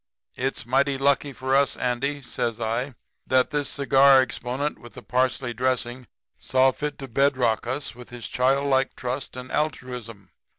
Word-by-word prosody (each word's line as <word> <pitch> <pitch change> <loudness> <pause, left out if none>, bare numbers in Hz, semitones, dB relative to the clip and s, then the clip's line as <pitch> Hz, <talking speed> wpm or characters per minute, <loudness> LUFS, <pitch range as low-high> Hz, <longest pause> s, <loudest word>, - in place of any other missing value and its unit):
"'It's 130 -2 -2
mighty 135 +3 +2
lucky 140 +1 +2
for 130 0 -1
us, 140 0 +3
Andy,' 135 +3 -1
says 120 -2 -3
I, 120 +4 -2 0.3
'that 130 +2 +3
this 145 -2 -1
cigar 135 -1 +5
exponent 130 +3 -2
with 120 - -14
the - - -10
parsley 125 0 0
dressing 125 0 -1 0.3
saw 130 0 +3
fit 150 +3 -4
to 135 - -7
bedeck 130 -3 +1
us 130 -1 -3
with 125 0 -12
his 120 -2 -7
childlike 135 +1 +1
trust 130 +1 -4
and 125 0 -8
altruism. 125 - -4
130 Hz, 155 wpm, -25 LUFS, 125-140 Hz, 0.3 s, cigar